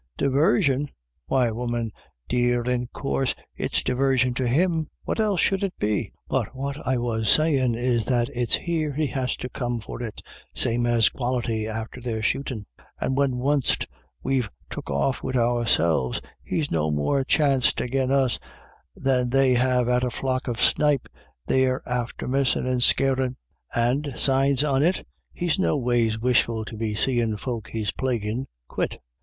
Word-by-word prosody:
" - - -40
Divarsion? 140 0 +2 0.4
why, 125 -3 +2
woman 120 -1 -2 0.4
dear, 120 0 +1
in 125 0 -1
coorse 70 - -1 0.2
it's - - 0
divarsion 130 -1 +2
to 130 - 0
him; 160 +4 +1 0.2
what - - -2
else 210 -4 +2
should 195 +3 +2
it 195 - -2
be? 105 -1 -1 0.2
But - - -1
what 140 +2 -5
I 130 -1 +2
was 115 -2 -1
savin' 135 -6 +3
is 120 -2 0
that 120 -2 +1
it's 120 -2 +2
here 160 -4 -2
he 155 +2 0
has 130 -1 -1
to - - -5
come 120 -2 -3
for 110 +2 -7
it, 110 -3 -6 0.3
same 120 +1 +1
as 115 -2 +4
Quality 120 -3 -2
after 110 +3 -5
their 115 -3 -3
shootin', 120 -3 -1 0.3
and 130 - -1
when 135 -2 +1
wunst 140 +1 +1 0.4
we've 130 -5 0 0.2
took - - -6
off 70 - 0
wid 130 0 -1
ourselves, 115 - +2 0.2
he's 155 -3 -2
no 80 -1 +1
more 75 - +1
chanst 135 -2 +2
agin 130 +1 0
us 135 -3 +2 0.6
than 125 -2 +1
they 135 0 +4
have 125 0 +2
at 125 0 +2
a 125 - +1
flock 130 +2 -2
of 120 -2 -2
snipe 145 -3 +3 0.4
they're 130 0 +1
after 125 -2 -3
missin' 135 0 +1
and 125 -1 0
scarin'. 130 0 +3 0.4
And, 130 +5 +1
signs 135 0 +3
on 140 -2 +2
it, 175 +5 +1 0.3
he's 175 +1 -1
noways 120 -9 +1
wishful 115 -2 +1
to 110 - -8
be 110 -1 -2
seein' 115 -1 +1
folk 115 -1 -4
he's 110 -2 -2
plaguin' 120 -1 -2 0.2
quit. - - -2
125 Hz, 160 wpm, -25 LUFS, 115-135 Hz, 0.6 s, as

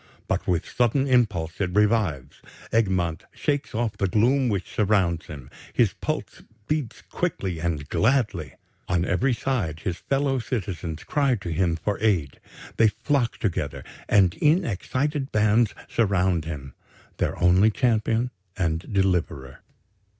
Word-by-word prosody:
But - - -1
with 85 -3 0
sudden 125 +3 +1
impulse 105 - +1
it 90 -1 -1
revives; 105 - +1 0.3
Egmont 95 -7 +1
shakes 145 -5 -1
off 110 -2 -1
the 100 - +1
gloom 125 +7 +3
which 100 -4 -3
surrounds 95 -6 +1
him; 70 -5 -10 0.2
his - - +3
pulse - - -4 0.3
beats 150 -7 -2
quickly 90 -4 -3
and 80 -4 -2
gladly. 110 - +1 0.3
On 90 -1 +1
every 125 +9 +1
side 95 - -2
his 90 -2 -2
fellow 135 +5 0
citizens 95 - -4
cry 140 -4 +1
to 95 -5 -6
him 85 0 +1
for 100 +5 -2
aid. 90 -11 0 0.4
They 115 - +6
flock 120 +4 0
together, 80 - -2 0.3
and 95 -4 +5
in 165 +5 +4
excited 135 - -2
bands 110 +1 +3
surround 95 -6 +1
him, 70 -5 -6 0.4
their - - -1
only 90 +4 +5
champion 115 +1 +1 0.3
and 80 -3 0
deliverer. 90 -9 0
100 Hz, 135 wpm, -25 LUFS, 85-120 Hz, 0.4 s, They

